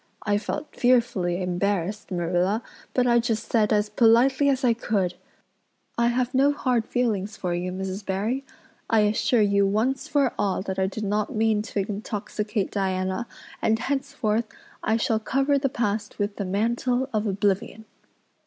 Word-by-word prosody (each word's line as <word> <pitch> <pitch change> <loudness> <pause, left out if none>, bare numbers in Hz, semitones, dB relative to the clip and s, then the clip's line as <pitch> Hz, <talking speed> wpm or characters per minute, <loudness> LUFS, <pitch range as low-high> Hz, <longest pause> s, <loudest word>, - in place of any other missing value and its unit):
I 205 -1 +1
felt 295 +8 -5
fearfully 205 -8 +2
embarrassed, 195 +2 -1
Marilla, 180 +4 0 0.3
but 250 - +2
I 240 -1 +4
just 230 -1 -2
said 220 -2 +3
as 210 -1 +3
politely 240 +6 +4
as 270 0 0
I 240 -2 +4
could, 205 -5 -1 0.8
'I 235 0 +2
have 245 +1 0
no 275 +2 +4
hard 250 -5 0
feelings 215 -4 -1
for 180 -2 -2
you, 180 +1 -2
Mrs. 190 +2 -4
Barry. 210 +8 -1 0.5
I 225 -2 +4
assure 215 +3 +2
you 200 -1 +3
once 225 +7 0
for 280 -4 +2
all 190 -2 0
that 190 -1 -4
I 190 - +2
did 215 +3 -5
not 210 +1 -1
mean 220 -1 +2
to 205 -2 -2
intoxicate 210 0 -3
Diana 190 +2 -1 0.3
and 220 - +2
henceforth 230 -4 -1 0.3
I 220 +1 +1
shall 225 -1 +1
cover 275 +5 +1
the 275 0 0
past 210 -3 -2
with 205 0 -2
the 200 - -2
mantle 235 +6 0
of 215 0 0
oblivion. 200 +2 -1
215 Hz, 160 wpm, -25 LUFS, 195-240 Hz, 0.8 s, I